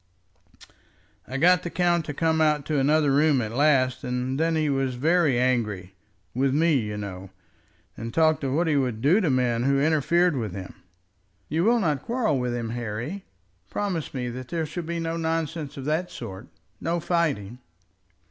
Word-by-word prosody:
"I 130 - -4
got 180 +4 +5
the 175 - -5
count 175 -2 +1
to 145 - -4
come 160 0 +1
out 155 -1 +4
into 145 +1 -1
another 150 +1 +3
room 145 0 +3
at 110 -2 -3
last, 130 -1 +2
and 125 +2 -2
then 165 0 +1
he 155 -1 +1
was 135 -2 0
very 155 -1 +2
angry, 105 -7 0 0.4
with 135 +2 +1
me, 165 +2 +3
you 105 -2 -4
know, 95 -2 -7 0.7
and 115 +1 -6
talked 155 +1 +2
of 135 -1 -1
what 165 +4 +2
he 155 -3 +1
would 125 -5 0
do 175 +10 +4
to 165 - +1
men 125 -3 +1
who 135 +2 +2
interfered 160 +3 +2
with 110 -7 -3
him." 95 -1 -7 0.8
"You 165 +4 +1
will 235 +2 +4
not 150 - 0
quarrel 230 - 0
with 125 -1 -1
him, 115 -2 -3
Harry? 120 - -5 0.4
Promise 185 -8 -3
me 125 -1 -2
that 125 +1 -7
there 165 0 -2
shall 175 +3 -5
be 170 +1 -4
no 165 0 -2
nonsense 160 -2 -3
of 135 - -6
that 160 +4 -1
sort, 95 0 -8 0.3
no 170 +1 -1
fighting." 145 - -1
145 Hz, 180 wpm, -25 LUFS, 125-165 Hz, 0.8 s, got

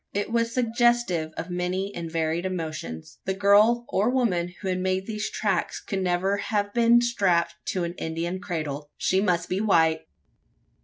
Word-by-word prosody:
It 205 +2 -1
was 230 0 +1
suggestive 240 -9 +1
of 170 +2 -5
many 180 +3 -2
and 170 -1 -5
varied 165 +1 -1
emotions. 155 - -5
The 190 - -1
girl 210 +4 +4
or 205 +5 +1
woman 195 -9 +1
who - - -2
had 185 -1 0
made 185 +1 -1
these 215 -1 -3
tracks 195 -5 -1
could 195 -1 -4
never 185 +2 +1
have 205 0 -1
been 235 0 +5
strapped 185 -8 +1
to 185 - -1
an 170 0 -3
Indian 170 +3 -3
cradle. 155 -6 -4
She 190 +1 +2
must 175 -4 +1
be 185 +2 -1
white! 160 -6 +2
185 Hz, 165 wpm, -25 LUFS, 170-210 Hz, -, been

